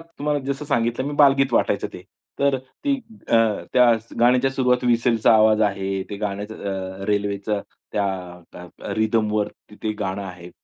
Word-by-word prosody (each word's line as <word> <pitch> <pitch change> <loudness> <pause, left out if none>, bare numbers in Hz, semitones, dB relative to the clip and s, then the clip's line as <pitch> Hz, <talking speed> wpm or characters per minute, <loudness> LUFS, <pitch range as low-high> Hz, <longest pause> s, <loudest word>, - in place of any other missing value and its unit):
तुम्हाला 150 -3 -3
जसं 140 +2 -3
सांगितलं 120 -1 0
मी 145 - -3
बालगीत 135 -3 +5
वाटायचं - - +1
ते. - - -9 0.4
तर 140 -1 +3
ती 130 - -3 0.3
अ, - - +4 0.4
त्या 120 -2 +5
स 115 - -22
गाण्याच्या 125 +2 +4
सुरुवाती 125 -1 +1
व्हिसलचा 115 -1 +3
आवाज 110 0 +5
आहे. 95 -1 -1
ते 100 - -4
गाण्याचं 105 +1 -4 0.5
अ, 95 - -5
रेल्वेचं 100 0 -1 0.3
त्या 100 -1 +1 0.5
त्य - - -11 0.3
अ, - - -3
रिदमवर 110 -1 +1 0.2
त - - -13
ते 110 -1 0
गाणं 95 0 -2
आहे. 90 -2 -9
115 Hz, 165 wpm, -22 LUFS, 105-130 Hz, 0.5 s, बालगीत